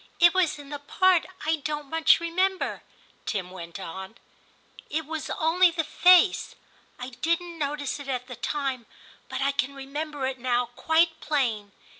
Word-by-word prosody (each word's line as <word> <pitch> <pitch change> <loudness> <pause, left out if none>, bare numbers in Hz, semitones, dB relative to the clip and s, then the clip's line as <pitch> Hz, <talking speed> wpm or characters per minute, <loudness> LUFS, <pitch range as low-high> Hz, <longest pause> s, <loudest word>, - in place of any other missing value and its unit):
* - - -34
It 345 -1 +7
was 370 -5 +2
in 285 -1 -11
the 290 0 -5
part 365 +4 +3 0.2
I 320 +1 +2
don't 295 0 -4
much 320 +2 +4
remember,' 370 +3 -1 0.5
Tim 185 -4 -2
went 170 0 -8
on; 190 +4 -7 0.4
* - - -35 0.3
it 315 +1 -2
was 315 -1 -5
only 345 +3 +3
the 325 -1 -1
face. 360 +5 +4 0.4
I 250 +1 -6
didn't 335 +6 -2
notice 290 0 -2
it 285 - -9
at 250 -2 -2
the 250 -1 -8
time, 265 -3 -3 0.4
but 260 +1 -4
I 280 - +2
can 280 0 -2
remember 285 +1 -4
it 260 -1 -3
now 245 -1 0
quite 325 +1 +2
plain. 230 -9 -1
290 Hz, 170 wpm, -26 LUFS, 255-325 Hz, 0.5 s, It